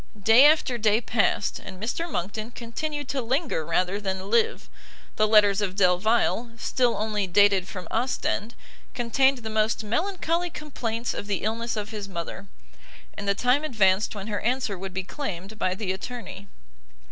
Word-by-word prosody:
Day 225 +7 +7
after 295 -6 +2
day 215 0 +3
passed, 220 -3 0
and 190 -1 -10
Mr 255 - -3
Monckton 210 +5 -3
continued 290 +5 -4
to 270 -1 -1
linger 260 - -1
rather 180 +5 0
than 190 0 -4
live; 230 -1 +2 0.5
the 215 - +3
letters 210 -2 +5
of 190 -2 -2
Delvile, 215 +5 +2
still 245 0 +1
only 210 -2 -1
dated 195 0 +4
from 185 -3 -7
Ostend, 235 -2 -1 0.4
contained 265 +3 +2
the 220 - -4
most 220 +1 +1
melancholy 340 - -1
complaints 240 -7 -4
of 205 - -6
the 200 -2 -2
illness 230 +2 -2
of 210 0 -3
his 205 -2 -6
mother; 170 +2 -6 0.7
and 200 - -6
the 200 - +2
time 250 +6 +2
advanced 210 -7 +2
when 195 -1 -6
her 210 -1 -2
answer 245 -3 0
would 190 +1 -6
be 190 +1 -3
claimed 205 - -6
by 185 - 0
the 195 -2 -2
attorney. 200 -1 -7
215 Hz, 160 wpm, -26 LUFS, 195-245 Hz, 0.7 s, Day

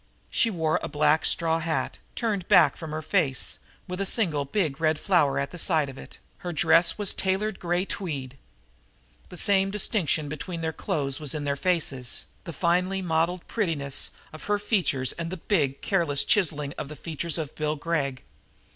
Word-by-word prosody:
She 230 - +3
wore 160 -6 +1
a - - -3
black 150 +1 +3
straw 165 -1 +2
hat, 160 -1 -2 0.2
turned 205 -6 -1
back 160 -6 +6
from 160 - -7
her 155 +1 -4
face, 140 -4 0 0.3
with 180 +2 -3
a - - +1
single 165 -11 +1
big 155 -2 -1
red 155 -1 +2
flower 175 -8 +3
at 140 0 -1
the 175 - -8
side 155 -5 +2
of 135 - -10
it; - - -11 0.2
her 180 -3 -4
dress 170 +1 +4
was 205 -2 +1
a - - -17
tailored 195 +2 0
gray 175 +1 0
tweed. 140 -11 -4 0.9
The 180 - -9
same 195 0 +3
distinction 190 -6 +1
between 165 +4 -5
their 160 0 -1
clothes 140 -3 -2
was 150 -1 -3
in 150 - -3
their 140 -1 0
faces, 140 -7 -1 0.2
the 170 - -5
finely 180 +3 +1
modeled 170 +1 0
prettiness 155 - 0 0.2
of 155 - -9
her 205 0 +2
features 180 - +1
and 165 0 -2
the 185 - -4
big, 150 -7 0
careless 165 -8 +1
chiseling 150 -9 +1
of 150 - -4
the 150 - -7
features 165 +2 -3
of 155 -3 -4
Bill 150 0 -1
Gregg. 145 -4 -2
165 Hz, 180 wpm, -27 LUFS, 145-185 Hz, 0.9 s, back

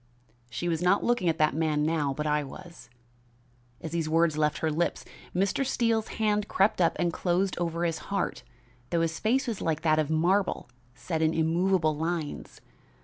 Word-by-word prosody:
She 175 - -4
was 165 -1 -1
not 180 +3 +3
looking 240 -7 +1
at 160 - 0
that 155 0 +3
man 155 -1 0
now, 155 -3 0
but 150 +3 -4
I 150 0 +1
was. 170 +5 -11 0.9
As 160 - -6
these 165 -2 -1
words 165 -1 +3
left 150 -1 +1
her 160 - -1
lips, 170 +3 -1 0.3
Mr. 195 +8 +1
Steele's 230 -4 0
hand 210 -1 0
crept 195 0 +2
up 170 - +3
and 175 -1 0
closed 185 +3 0
over 170 0 -1
his 165 -2 -1
heart, 200 0 -2 0.5
though 170 - +1
his 165 -1 -1
face 245 +5 +1
was 230 -5 -4
like 160 -2 -1
that 155 -1 +3
of 155 -1 0
a - - 0
marble 185 +5 +1
image 120 0 -31
set 160 -3 -2
in 160 0 +2
immovable 165 0 +2
lines. 160 -1 -4
165 Hz, 190 wpm, -28 LUFS, 155-190 Hz, 0.9 s, not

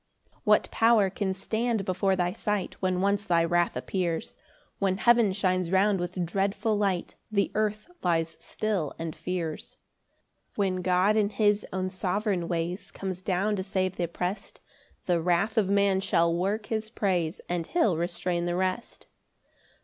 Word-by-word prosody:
7 - - -32
What - - +3
power 225 -4 +4
can 195 0 -1
stand 220 +1 -1
before 190 +1 +1
thy 180 -1 0
sight 210 -3 -2
When 185 -1 +1
once 200 +1 +1
thy 170 -1 +3
wrath 175 +1 +1
appears? 175 -4 -2 0.4
When 190 -1 +1
heaven 235 -1 +4
shines 185 -2 0
round 195 +1 +3
with 175 0 -2
dreadful 195 +5 0
light, 195 -4 0 0.2
The 200 -2 +1
earth 215 0 -1
lies 165 -2 0
still 200 -9 -2
and 165 -1 -5
fears. 170 -4 -4 0.8
8 - - -32
When 195 -3 +1
God 185 +4 +3
in 205 -2 +3
his 210 -1 +1
own 185 0 -2
sovereign 185 -1 -1
ways 170 +2 -3
Comes 185 -2 -5
down 195 +3 0
to 190 - -2
save 185 -1 -1
th' 175 -2 -1
opprest, 180 +3 -4 0.5
The 175 -2 +2
wrath 180 +5 +1
of 205 -4 +2
man 200 -1 +3
shall 170 -3 +2
work 200 +5 -1
his 220 -1 -3
praise, 180 -6 -1
And 175 -2 -2
he'll 280 - +2
restrain 175 +1 -1
the 175 0 -1
rest. 185 +5 -2
190 Hz, 160 wpm, -28 LUFS, 175-205 Hz, 0.8 s, power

